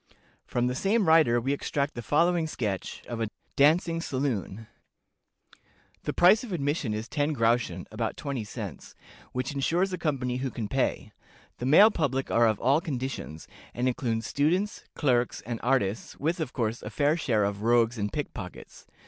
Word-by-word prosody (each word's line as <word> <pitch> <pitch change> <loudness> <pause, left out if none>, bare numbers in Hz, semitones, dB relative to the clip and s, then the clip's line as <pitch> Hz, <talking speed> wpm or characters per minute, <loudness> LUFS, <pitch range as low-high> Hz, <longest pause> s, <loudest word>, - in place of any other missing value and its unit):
From 120 0 0
the 125 - 0
same 200 - +1
writer 155 -7 +5
we 135 +4 0
extract 140 0 -2
the 120 - -5
following 170 +5 +2
sketch 105 -10 -4
of 115 -1 -4
a 110 - 0 0.3
DANCING 165 +3 +3
SALOON. 125 - -3 1.4
"The - - 0
price 190 +6 +5
of 240 - -7
admission 145 -6 -1
is 110 +1 -3
ten 150 0 0
groschen 115 -7 +1
(about 110 0 -3
twenty 140 -6 -3
cents), 105 - -8 0.4
which 130 +3 -3
insures 175 +7 +1
a 180 - -3
company 135 -6 -1
who 130 +1 -2
can 115 -4 -4
pay. 135 +4 -1 0.5
The 125 - -2
male 200 +10 +8
public 135 -7 -1
are 115 0 +4
of 110 -2 +1
all 140 +6 +3
conditions, 130 - -5 0.3
and 125 +1 0
include 120 -3 -1
students, 180 - 0
clerks, 125 -5 +1
and 115 -1 -5
artists, 115 -5 0
with, 165 +5 -1
of 155 -6 -3
course, 115 -2 -2
a 105 - -6
fair 145 +7 +2
share 115 -10 +1
of 100 0 -2
rogues 115 0 +3
and 105 0 -1
pickpockets. 95 -11 -7
130 Hz, 165 wpm, -27 LUFS, 115-155 Hz, 1.4 s, male